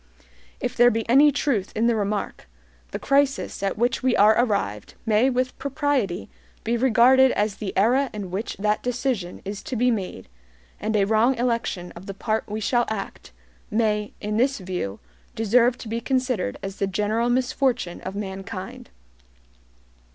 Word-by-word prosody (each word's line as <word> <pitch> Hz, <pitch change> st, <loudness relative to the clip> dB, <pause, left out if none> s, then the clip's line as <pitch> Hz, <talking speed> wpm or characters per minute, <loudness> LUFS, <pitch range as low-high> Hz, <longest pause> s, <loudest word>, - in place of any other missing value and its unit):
If -, -, -3 dB
there 240 Hz, 0 st, +6 dB
be 225 Hz, -1 st, -2 dB
any 280 Hz, +5 st, +6 dB
truth 260 Hz, -9 st, -1 dB
in 225 Hz, -, +1 dB
the 235 Hz, -1 st, +3 dB
remark, 205 Hz, -1 st, -3 dB, 0.4 s
the -, -, -4 dB
crisis 275 Hz, -5 st, +1 dB
at 195 Hz, 0 st, -1 dB
which 240 Hz, +2 st, +1 dB
we 255 Hz, -1 st, +2 dB
are 210 Hz, +2 st, +6 dB
arrived 200 Hz, -, -1 dB
may 225 Hz, +3 st, +3 dB
with 255 Hz, 0 st, -1 dB
propriety 275 Hz, -, -1 dB, 0.4 s
be 235 Hz, -, 0 dB
regarded 260 Hz, +2 st, +5 dB
as 205 Hz, -1 st, -1 dB
the 205 Hz, -3 st, -4 dB
era 250 Hz, +7 st, +3 dB
in 200 Hz, -4 st, -6 dB
which 200 Hz, +5 st, -4 dB
that 210 Hz, +1 st, 0 dB
decision 245 Hz, -7 st, -2 dB
is 200 Hz, +1 st, -5 dB
to 255 Hz, -, -5 dB
be 245 Hz, +2 st, +3 dB
made; 185 Hz, -, -4 dB, 0.5 s
and 215 Hz, +1 st, -2 dB
a 200 Hz, -2 st, +3 dB
wrong 225 Hz, +5 st, +3 dB
election 230 Hz, -7 st, -2 dB
of 175 Hz, +3 st, -11 dB
the 195 Hz, -, -6 dB
part 220 Hz, +1 st, -2 dB
we 210 Hz, +1 st, -3 dB
shall 240 Hz, +3 st, +1 dB
act 205 Hz, -, -6 dB, 0.4 s
may, 210 Hz, -1 st, 0 dB
in 210 Hz, +1 st, -2 dB
this 270 Hz, +4 st, +2 dB
view, 180 Hz, -, -4 dB, 0.4 s
deserve 235 Hz, +3 st, +3 dB
to 235 Hz, -, -9 dB
be 230 Hz, +2 st, -3 dB
considered 255 Hz, -, -1 dB
as 195 Hz, 0 st, -5 dB
the 195 Hz, -, 0 dB
general 210 Hz, +5 st, 0 dB
misfortune 250 Hz, -6 st, 0 dB
of 190 Hz, +1 st, -6 dB
mankind. 195 Hz, -, -6 dB
220 Hz, 165 wpm, -24 LUFS, 200-250 Hz, 0.5 s, there